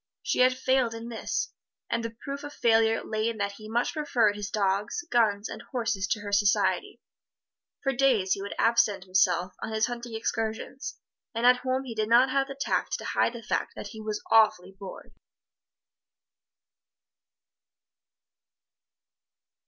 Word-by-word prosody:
She - - -1
had 255 0 +5
failed 260 -3 +1
in 230 +1 -7
this, 230 - -3 0.3
and 230 - -1
the 230 - -2
proof 280 +1 -5
of 290 0 -7
failure 225 -2 +3
lay 215 +1 -1
in 230 - -5
that 200 -1 -1
he 215 0 -10
much 235 +2 0
preferred 245 -9 +2
his 205 -1 -5
dogs, 205 - 0
guns 215 -3 +2
and - - -8
horses 225 -6 -1
to 210 - -1
her 205 0 -6
society. 200 0 +2 0.8
For 270 -1 +1
days 240 -8 +2
he 195 - -4
would 200 - -5
absent 225 -4 +3
himself 185 -1 +2
on - - -4
his 220 0 +2
hunting 240 -2 -6
excursions, 225 +4 -3 0.4
and 230 +1 0
at 250 0 +7
home 260 +1 -1
he 250 -3 -6
did 215 -1 -1
not 250 +3 +5
have 270 0 +1
the 275 0 -8
tact - - -1
to - - -9
hide - - +1
the 235 -1 -8
fact - - -2
that 205 - -7
he 220 +1 -9
was 215 -1 -4
awfully 210 -5 +4
bored. 195 -1 -11
225 Hz, 160 wpm, -27 LUFS, 205-245 Hz, 0.8 s, at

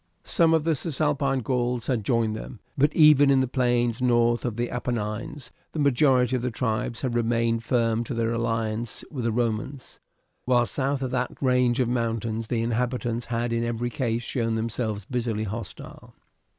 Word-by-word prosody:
Some 165 -1 +3
of 160 - +1
the 165 0 +2
Cisalpine 140 -2 0
Gauls 125 0 -1
had 120 -5 -1
joined 115 0 +1
them, 115 +1 -8 0.2
but 145 +2 +3
even 150 -3 +7
in 135 -1 +5
the 130 - +1
plains 120 -1 +1
north 120 -1 +2
of 120 -3 -2
the 120 +1 -2
Apennines 120 +4 -4 0.2
the - - -5
majority 130 -3 +3
of 125 - -1
the 125 - -1
tribes 115 0 -2
had 130 -3 -1
remained 115 -1 +1
firm 115 -1 +1
to 125 - -4
their 115 0 0
alliance 115 -1 -2
with 130 -6 -4
the 115 - +1
Romans, 120 +3 -3 0.5
while 125 -1 +3
south 135 +4 -1
of 130 - -3
that 125 0 -2
range 125 -2 +2
of 125 - +2
mountains 115 -2 -2
the 115 -1 -1
inhabitants 120 0 -1
had 120 0 -1
in 115 0 0
every 120 +1 -2
case 120 -3 -1
shown 115 -2 -1
themselves 110 -2 -3
bitterly 115 -3 -2
hostile. 105 -1 -8
120 Hz, 175 wpm, -25 LUFS, 115-130 Hz, 0.5 s, even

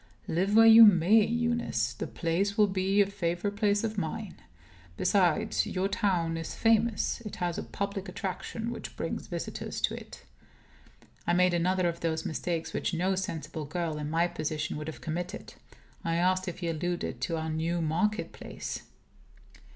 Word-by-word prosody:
"Live 190 +5 +1
where 225 0 +8
you 225 0 +10
may, 205 +2 +6
Eunice, 235 - 0
the 120 - -5
place 190 +5 -1
will 210 - +6
be 195 +1 +2
a - - +5
favorite 195 0 -2
place 205 0 +2
of 220 -2 -1
mine. 195 +4 -4 0.6
Besides, 180 -6 +2
your 185 +1 0
town 185 -6 0
is 165 - -5
famous. 225 0 +2
It 215 -3 -7
has 175 -1 -2
a - - -4
public 200 -1 -4
attraction 220 +5 -4
which - - -7
brings - - -4
visitors - - -5
to - - +1
it." - - -9 1.0
I 175 - +3
made 180 0 +4
another 180 +1 +2
of 170 0 -2
those 160 -1 -1
mistakes 160 0 -3
which 175 - -1
no 185 +3 +1
sensible 160 -4 -4
girl, 160 0 -3
in 150 0 -3
my 165 +2 +2
position, 155 -2 -3
would 150 +1 -6
have 160 - -7
committed. 175 +6 -5 0.5
I 165 0 0
asked 185 +2 +2
if 180 +1 -5
he 170 - -2
alluded 165 -5 -3
to 165 +5 -1
our 160 0 -3
new 165 +2 -1
market 175 +7 0
place. - - -6
180 Hz, 165 wpm, -29 LUFS, 165-205 Hz, 1.0 s, you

